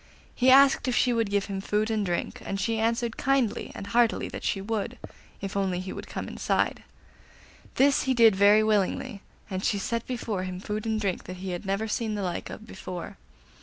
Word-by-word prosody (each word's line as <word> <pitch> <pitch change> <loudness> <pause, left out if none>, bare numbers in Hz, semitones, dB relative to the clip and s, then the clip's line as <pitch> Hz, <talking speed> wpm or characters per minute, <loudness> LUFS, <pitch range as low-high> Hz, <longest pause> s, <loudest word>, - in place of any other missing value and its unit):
He 255 +1 +3
asked 270 0 +6
if 250 - +1
she 250 - +3
would 230 -3 +1
give 200 -1 +1
him 195 -1 -4
food 210 +2 0
and 215 -2 0
drink, 175 -3 -3
and 195 - -3
she 220 +4 0
answered 230 +1 0
kindly 270 -5 0
and - - -6
heartily 230 +3 +2
that - - -7
she 195 - 0
would, 210 +1 -3 0.4
if 195 0 -4
he 200 - 0
would - - +1
only 185 0 -3
come - - -5
inside. - - 0 0.9
This 275 +1 +4
he 260 -1 +1
did 225 -4 +6
very 205 +2 +6
willingly, 210 +1 0 0.3
and 190 -1 -4
she 210 - +1
set 230 +4 -2
before 230 -6 -3
him 185 -1 -5
food 210 +2 -4
and 220 -1 0
drink 195 -4 -2
that 185 - -7
he 185 0 -5
had 175 +2 -5
never 200 +3 -1
seen 220 0 -1
the 205 - -3
like 180 -2 -3
of 220 - -9
before. 190 -2 -7
210 Hz, 205 wpm, -27 LUFS, 195-230 Hz, 0.9 s, asked